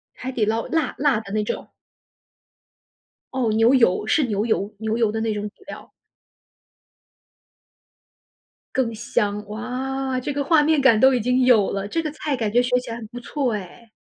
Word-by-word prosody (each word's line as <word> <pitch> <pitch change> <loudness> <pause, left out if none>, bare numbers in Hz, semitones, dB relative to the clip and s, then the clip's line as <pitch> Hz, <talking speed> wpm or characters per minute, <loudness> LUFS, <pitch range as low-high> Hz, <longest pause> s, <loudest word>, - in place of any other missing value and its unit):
海 260 +1 -5
底 230 -4 0
捞 225 +2 -1
辣 320 -2 -1
辣 280 -5 +2
的 200 -3 -10
那 215 0 +1
种？ - - -5 1.6
哦， 250 -4 0
牛 225 +3 +4
油， 220 -5 +3
是 310 - +3
牛 210 -2 -1
油， 210 -2 -1
牛 220 0 -1
油 225 -3 +2
的 220 - -3
那 225 -1 0
种 210 0 -3
底 220 - -24
料。 - - -10 2.9
更 240 -3 0
香， 210 -2 -1
哇， 255 +4 -3
这 255 - -3
个 285 0 -1
画 320 +1 +4
面 305 0 +3
感 230 -5 +5
都 265 +3 +6
已 250 - +2
经 250 +3 +2
有 225 -6 +4
了， 200 0 -3
这 330 - -1
个 310 -2 -4
菜 300 -1 -3
感 225 -4 -2
觉 240 +3 +4
学 250 0 +1
起 250 - -9
来 230 - -4
很 225 -2 -8
不 240 +3 -9
错 255 0 -2
哎。 210 +3 -8
235 Hz, 195 characters per minute, -22 LUFS, 215-265 Hz, 2.9 s, 都